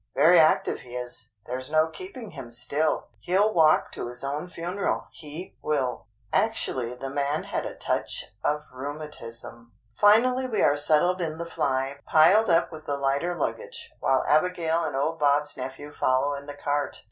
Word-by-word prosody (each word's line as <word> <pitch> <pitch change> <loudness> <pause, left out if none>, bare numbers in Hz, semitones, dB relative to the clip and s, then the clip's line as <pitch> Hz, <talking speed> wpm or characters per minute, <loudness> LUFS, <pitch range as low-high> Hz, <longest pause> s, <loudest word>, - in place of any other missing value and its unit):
Very 165 +4 +6
active 155 - +3
he 125 0 -10
is, 125 -2 -2 0.2
there's 130 +2 -4
no 155 +1 +3
keeping 255 - -9
him 135 -6 -8
still. 140 +6 0
He'll 200 +5 +2
walk 155 -2 +4
to - - -5
his 125 +2 -4
own 145 +5 -3
funeral, 180 +3 -2
he 155 +4 -9
will." 130 -7 -1 0.3
Actually 130 - 0
the 135 +2 -6
man 145 +2 -1
had - - -3
a - - -8
touch - - -2
of 150 0 0
rheumatism! 130 -4 -8 0.2
Finally 250 - +4
we 220 -5 0
are 145 - +4
settled 155 +5 +3
in 160 -2 -3
the 170 - -4
fly, 140 -4 -1
piled 185 +8 +5
up 165 0 +3
with 155 -1 -10
the 145 - -1
lighter 140 +6 0
luggage, 480 - -4
while 130 - +2
Abigail 165 +1 +2
and 145 -4 -3
old 155 +4 -1
Bob's 145 0 +2
nephew 135 +3 -7
follow 135 0 +1
in 140 0 -7
the 145 - -7
cart. 145 0 -2
150 Hz, 170 wpm, -26 LUFS, 135-170 Hz, 0.3 s, Very